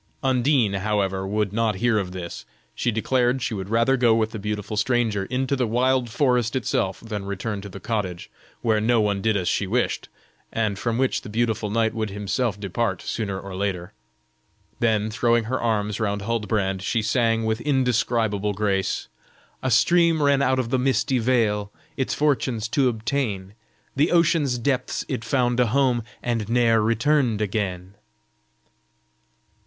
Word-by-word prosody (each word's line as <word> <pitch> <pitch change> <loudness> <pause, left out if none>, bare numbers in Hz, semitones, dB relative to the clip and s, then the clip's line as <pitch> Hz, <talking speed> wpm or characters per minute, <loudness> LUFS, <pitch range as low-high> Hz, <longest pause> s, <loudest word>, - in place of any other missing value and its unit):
Undine, 130 -4 +2
however, 95 -1 -1
would 105 -1 -1
not 110 -1 +1
hear 110 +2 +2
of 95 -2 -4
this; 90 -2 -7 0.3
she 90 - -1
declared 125 +3 +1
she 115 - -2
would 95 -2 -5
rather 115 +4 +3
go 120 -3 +4
with 110 -1 0
the 110 - -6
beautiful 105 +1 -4
stranger, 110 -3 +1
into 130 +4 -1
the 125 -3 0
wild 125 +2 +1
forest 125 -1 +1
itself, 115 -7 -1
than 105 -3 -5
return 100 +1 -4
to 100 - -8
the 100 - -9
cottage, 95 -5 -3 0.4
where 110 -2 +2
no 115 +1 +3
one 100 -2 +1
did 110 0 +2
as 90 -2 -2
she 100 - 0
wished, 120 +5 -1 0.4
and 110 -3 -1
from 115 -1 -1
which 130 0 +1
the - - -9
beautiful 110 -1 -1
knight 110 +1 +1
would 110 -2 -2
himself 105 +2 -2
depart 100 -1 -2
sooner 100 -4 -3
or 95 -1 -8
later. 95 -1 -3 0.9
Then, 110 -2 +1
throwing 115 +1 +2
her 125 +4 -2
arms 105 -2 0
round 100 -2 -1
Huldbrand, 105 -4 -1
she 110 +3 0
sang 115 0 +1
with 110 +1 -1
indescribable 115 -6 +1
grace: 100 -2 -1 0.5
"A 130 - -1
stream 165 +7 +4
ran 140 -1 +3
out 130 -1 +2
of 125 -2 -2
the 130 - +2
misty 130 0 +1
vale 110 -4 +1 0.2
Its 135 - -1
fortunes 130 -6 0
to 130 0 +2
obtain, 110 -4 -2 0.4
the 145 +4 +3
ocean's 165 -6 +3
depths 125 +1 -1
it 125 -4 -3
found 120 0 +1
a 125 - +4
home 125 0 +2 0.2
And 115 -3 -1
ne'er 115 -2 +3
returned 115 +1 +2
again." 95 -3 -2
115 Hz, 160 wpm, -24 LUFS, 105-125 Hz, 0.9 s, go